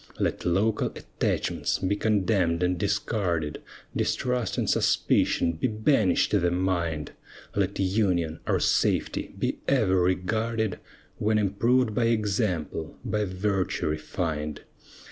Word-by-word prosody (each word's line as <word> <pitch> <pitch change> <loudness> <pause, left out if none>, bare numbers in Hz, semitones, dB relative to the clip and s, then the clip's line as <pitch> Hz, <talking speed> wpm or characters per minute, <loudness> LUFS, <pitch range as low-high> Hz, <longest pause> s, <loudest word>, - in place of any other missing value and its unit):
Let - - -1
local 100 +5 +2
attachments - - -1
be 95 +2 0
condemn'd 95 -5 +1
and 90 0 +2
discarded, 90 -5 -1 0.3
Distrust 125 -2 -1
and - - 0
suspicion 85 - +2
be 80 +9 -1
banish'd 110 -2 +2
the 90 -4 +3
mind, 85 -4 -1 0.4
Let 100 -1 0
union, 95 -5 +1
our - - +2
safety, - - 0
be - - -1
ever 100 -9 +3
regarded, 110 +4 0 0.4
When 110 +1 +2
improved 110 +4 +2
by 115 +2 +1
example, 100 - -1
by 105 -2 0
virtue 95 -2 -1
refined. 75 -1 -3
95 Hz, 110 wpm, -27 LUFS, 85-110 Hz, 0.4 s, the